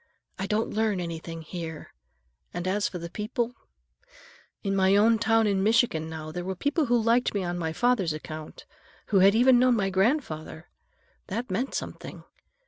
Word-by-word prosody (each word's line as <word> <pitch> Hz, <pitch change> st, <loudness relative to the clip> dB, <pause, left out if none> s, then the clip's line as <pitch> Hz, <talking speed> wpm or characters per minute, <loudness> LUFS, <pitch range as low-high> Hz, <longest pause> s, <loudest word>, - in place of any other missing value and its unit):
I 190 Hz, -, -2 dB
don't 215 Hz, +3 st, 0 dB
learn 215 Hz, -3 st, +1 dB
anything 165 Hz, -1 st, -6 dB
here, 160 Hz, -1 st, -7 dB, 0.6 s
and 175 Hz, +1 st, -3 dB
as 205 Hz, +2 st, 0 dB
for 180 Hz, -, -6 dB
the 170 Hz, 0 st, -6 dB
people—In 245 Hz, -, -7 dB
my 190 Hz, 0 st, +4 dB
own 220 Hz, +2 st, +4 dB
town 225 Hz, 0 st, +3 dB
in 200 Hz, -2 st, +1 dB
Michigan, 215 Hz, -7 st, +2 dB
now, 155 Hz, -1 st, -6 dB
there 175 Hz, +2 st, -5 dB
were 190 Hz, +1 st, -3 dB
people 285 Hz, -, 0 dB
who 240 Hz, 0 st, +3 dB
liked 230 Hz, +1 st, +2 dB
me 200 Hz, -, 0 dB
on 175 Hz, 0 st, -3 dB
my 160 Hz, -2 st, -2 dB
father's 210 Hz, -2 st, +1 dB
account, 155 Hz, 0 st, -8 dB, 0.4 s
who 200 Hz, -, +4 dB
had 195 Hz, +2 st, +6 dB
even 245 Hz, +1 st, +6 dB
known 250 Hz, -1 st, +4 dB
my 195 Hz, -3 st, 0 dB
grandfather. 190 Hz, -, -1 dB, 0.6 s
That 225 Hz, +2 st, -4 dB
meant 240 Hz, +8 st, -2 dB
something. -, -, -6 dB
200 Hz, 165 wpm, -27 LUFS, 175-230 Hz, 0.6 s, had